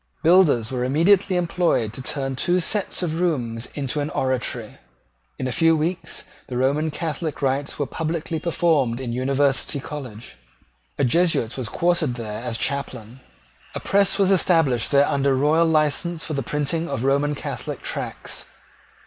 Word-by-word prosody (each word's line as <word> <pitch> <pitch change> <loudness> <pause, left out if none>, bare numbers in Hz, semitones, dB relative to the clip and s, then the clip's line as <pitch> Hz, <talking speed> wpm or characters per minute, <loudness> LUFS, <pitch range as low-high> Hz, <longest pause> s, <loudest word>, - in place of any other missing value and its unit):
Builders 155 -10 +4
were 125 -1 -1
immediately 180 +8 +3
employed 170 -10 +1
to 130 - -6
turn 135 0 -2
two 175 +7 +1
sets 190 +1 0
of 165 0 -2
rooms 120 -9 -1
into 145 0 -2
an 145 +1 -2
oratory. 125 -5 -2 0.6
In - - -3
a - - -2
few 165 +2 +3
weeks 165 +4 -2 0.2
the 125 - -4
Roman 140 +5 +1
Catholic 155 -1 -4
rites 135 +2 -1
were 145 - -1
publicly 160 +2 -3
performed 155 -8 +1
in 125 -3 -4
University 135 +3 0
College. 125 - -8 0.6
A - - +1
Jesuit 140 -4 +2
was 125 -4 -4
quartered 170 -7 +1
there 110 -3 -5
as 115 - -3
chaplain. 130 -4 -3 0.6
A - - -2
press 200 -1 +2
was 195 -1 +3
established 165 -10 +3
there 140 0 +4
under 140 -1 +2
royal 155 +5 +3
license 160 +2 +1
for 155 - -4
the 140 - -1
printing 150 +6 -2
of 115 - -3
Roman 140 +2 +1
Catholic - - -5
tracts. - - -5
145 Hz, 155 wpm, -23 LUFS, 130-165 Hz, 0.6 s, Builders